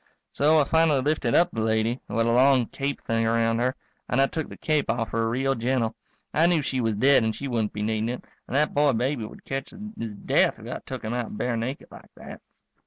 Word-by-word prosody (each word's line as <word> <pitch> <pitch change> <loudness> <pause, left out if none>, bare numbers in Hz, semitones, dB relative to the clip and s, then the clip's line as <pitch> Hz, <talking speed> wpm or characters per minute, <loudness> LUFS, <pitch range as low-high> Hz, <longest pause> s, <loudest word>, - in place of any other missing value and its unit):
So 155 +3 +3
I 150 - +5
finally 160 -1 +3
lifted 140 -4 0
up 175 +1 +4
the 115 - -3
lady, 110 +2 0
who - - -4
had 115 - +3
a 115 - +2
long 130 +1 +4
cape 140 +4 -4
thing 115 0 0
around 115 0 +1
her, 125 +2 0 0.3
and 125 - +1
I 135 - +6
took 160 +2 -4
the - - -10
cape 155 -2 0
off 115 -2 -1
her 115 0 0
real 135 +3 +1
gentle. 120 -2 0 0.4
I 165 +3 +4
knew 170 -4 +2
she 130 -1 -1
was 110 -2 0
dead 135 +3 +4
and 110 -1 -1
she 140 +5 -5
wouldn't 115 -5 -1
be 105 - -4
needin' 110 +1 -1
it, 125 - -5 0.2
and - - -5
that 150 +2 +2
boy 145 -1 +3
baby 125 0 -1
would - - -12
catch 135 0 -4
his 210 - -7
death - - +2
if - - -12
I - - -5
took - - -6
him 110 +1 -3
out 120 -3 -4
bare 125 -1 -1
naked 120 +5 -4
like - - -14
that. - - -11
125 Hz, 245 wpm, -25 LUFS, 115-140 Hz, 0.4 s, I